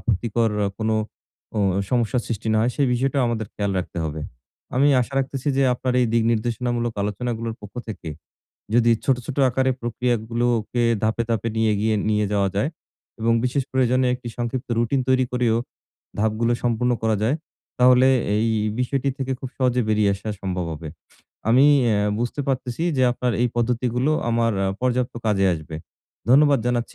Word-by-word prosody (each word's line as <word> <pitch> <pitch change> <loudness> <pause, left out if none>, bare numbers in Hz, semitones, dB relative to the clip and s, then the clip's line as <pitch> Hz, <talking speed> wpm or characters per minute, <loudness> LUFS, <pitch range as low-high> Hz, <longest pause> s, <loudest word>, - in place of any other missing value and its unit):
আপত্তিকর 115 +2 0 0.2
অ - - 0
কোন 110 -1 -1 0.7
ও - - +1 0.3
সমস্যার 120 0 +1
সৃষ্টি 110 -1 -3
না 110 - +3
হয়, 120 +3 +2
সে 145 - +1
বিষয়টাও 135 +2 +1
আমাদের 110 -2 -2
খেয়াল 100 -1 -1
রাখতে 90 -1 -5
হবে। 80 0 -4 0.6
আমি 140 +3 +4
আশা 125 +3 -3
রাখতেছি 135 +1 -2
যে, 135 - +3
আপনার 125 0 -2
এই 125 - +3
দিক 115 -1 +3
নির্দেশনামূলক 120 +1 -1
আলোচনাগুলোর 115 +2 -3
পক্ষ 105 0 -11
থেকে 100 -6 -6 0.7
যদি 120 -1 +4
ছোট, 135 -2 +3
ছোট 140 - -5
আকারে 130 +1 +1
প্রক্রিয়াগুলোকে 120 0 -1 0.2
ধাপে, 110 +2 +1
ধাপে 115 0 0
নিয়ে 110 -1 +2
গিয়ে 110 0 +1 0.2
নিয়ে 105 0 +1
যাওয়া 100 -1 +2
যায় 135 +9 +1 0.5
এবং 115 +1 +2
বিশেষ 130 +2 0
প্রয়োজনে 130 0 +2
একটি 125 -1 -7
সংক্ষিপ্ত 120 +2 -3
রুটিন 120 +4 +1
তৈরি 130 0 +3
করেও, 120 -2 +2 0.6
ধাপগুলো 110 +2 +1
সম্পন্ন 120 +1 +1
করা 110 -1 +2
যায়। 135 +7 +2 0.4
তাহলে 125 +1 +6 0.3
এই 115 +2 +1 0.3
বিষয়টি 135 +2 0
থেকে 135 0 -2
খুব 130 - -5
সহজে 125 -1 +2
বেরিয়ে 105 -2 +3
আসা 100 +3 -8
সম্ভব 90 -2 -2
হবে। 80 +1 -8 0.6
আমি 130 +5 +6 0.2
অ্যা 105 -3 +2 0.2
বুঝতে 120 +4 -2
পারতেছি 130 +1 -2
যে 130 - +2
আপনার 125 -1 -1
এই 125 - +2
পদ্ধতিগুলো 125 +3 0 0.2
আমার 115 0 +2
অ্যা 95 - +1
পর্যাপ্ত 125 -1 0
কাজে 100 -2 +2
আসবে। 80 0 -7 0.5
ধন্যবাদ 140 0 +6
জানাচ্ছি 120 -1 -1
120 Hz, 165 wpm, -23 LUFS, 110-125 Hz, 0.7 s, তাহলে